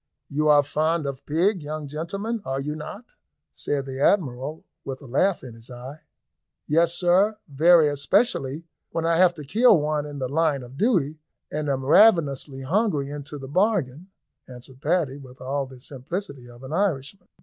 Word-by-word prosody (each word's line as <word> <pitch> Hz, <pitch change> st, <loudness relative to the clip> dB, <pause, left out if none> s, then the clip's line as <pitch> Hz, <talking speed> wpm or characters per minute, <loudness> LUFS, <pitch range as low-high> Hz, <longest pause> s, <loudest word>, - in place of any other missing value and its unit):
"You 150 Hz, +2 st, 0 dB
are 145 Hz, -1 st, +6 dB
fond 155 Hz, +2 st, 0 dB
of 135 Hz, -1 st, -6 dB
pig, 180 Hz, +5 st, +1 dB
young 150 Hz, 0 st, -5 dB
gentlemen, 195 Hz, +10 st, -4 dB
are 135 Hz, -5 st, -3 dB
you 150 Hz, +2 st, -3 dB
not?" 155 Hz, +9 st, -8 dB, 0.5 s
said 140 Hz, -2 st, -3 dB
the 135 Hz, -1 st, -6 dB
Admiral, 150 Hz, -4 st, 0 dB, 0.2 s
with 130 Hz, -1 st, -6 dB
a -, -, -13 dB
laugh 165 Hz, +9 st, +1 dB
in 125 Hz, -3 st, -9 dB
his 115 Hz, +2 st, -14 dB
eye. 130 Hz, +5 st, -9 dB, 0.6 s
"Yes, 165 Hz, +2 st, +3 dB
sir, 190 Hz, +4 st, +3 dB
very, 160 Hz, +3 st, +5 dB
especially 145 Hz, -, 0 dB, 0.3 s
when 165 Hz, -, -2 dB
I 165 Hz, 0 st, +2 dB
have 175 Hz, -1 st, +5 dB
to 150 Hz, -, -8 dB
kill 215 Hz, -, +4 dB
one 150 Hz, 0 st, -1 dB
in 145 Hz, -1 st, -8 dB
the 130 Hz, -2 st, -2 dB
line 145 Hz, -1 st, 0 dB
of 125 Hz, +2 st, -12 dB
duty, 160 Hz, -, +1 dB, 0.3 s
and 150 Hz, -1 st, -2 dB
am 135 Hz, -1 st, -1 dB
ravenously 145 Hz, -6 st, +4 dB
hungry 155 Hz, -, 0 dB
into 145 Hz, 0 st, -7 dB
the 135 Hz, -1 st, -8 dB
bargain," 180 Hz, -, 0 dB, 0.4 s
answered 125 Hz, +1 st, -12 dB
Paddy, 155 Hz, -4 st, 0 dB
with 130 Hz, -2 st, -14 dB
all 135 Hz, +1 st, -2 dB
the 130 Hz, -1 st, -13 dB
simplicity 135 Hz, +1 st, -7 dB
of 120 Hz, +1 st, -14 dB
an 130 Hz, +3 st, -7 dB
Irishman. 180 Hz, 0 st, -2 dB
150 Hz, 170 wpm, -24 LUFS, 135-175 Hz, 0.6 s, are